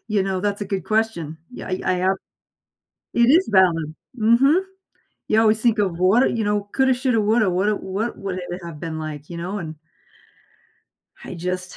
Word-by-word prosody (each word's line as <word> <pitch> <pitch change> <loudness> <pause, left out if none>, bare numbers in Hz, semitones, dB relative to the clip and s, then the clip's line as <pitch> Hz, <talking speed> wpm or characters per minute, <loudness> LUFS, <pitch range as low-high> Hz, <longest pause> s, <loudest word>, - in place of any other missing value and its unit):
You 210 -2 +1
know, 190 -1 -2
that's 205 +1 -1
a - - -2
good 190 -3 -3
question. 215 -8 -1
Yeah, - - -8
i 185 - -2
I - - +2 0.2
a - - +5 1.0
It 235 0 +4
is 340 +7 +4
valid. 165 -5 +3 0.2
Mhm. 250 - +4 0.7
You 220 - +4
always 220 -1 +3
think 230 -1 +2
of 185 -5 -1
what 190 +8 +4
i - - +3
you 225 -2 -1
know, 205 0 -1
coulda, 265 -1 +3
shoulda, 250 -2 +1
woulda 215 -1 +2
woulda 195 +4 +1
What 205 +5 -3
would 195 -3 -4
it 180 0 -6
have 165 -3 -8
been 165 -2 -4
like, 155 -1 -6
you 170 - -6
know? 180 +5 -4
And 160 -4 -6 1.5
I - - -7
just, 180 +2 -4
195 Hz, 190 wpm, -22 LUFS, 175-220 Hz, 1.5 s, a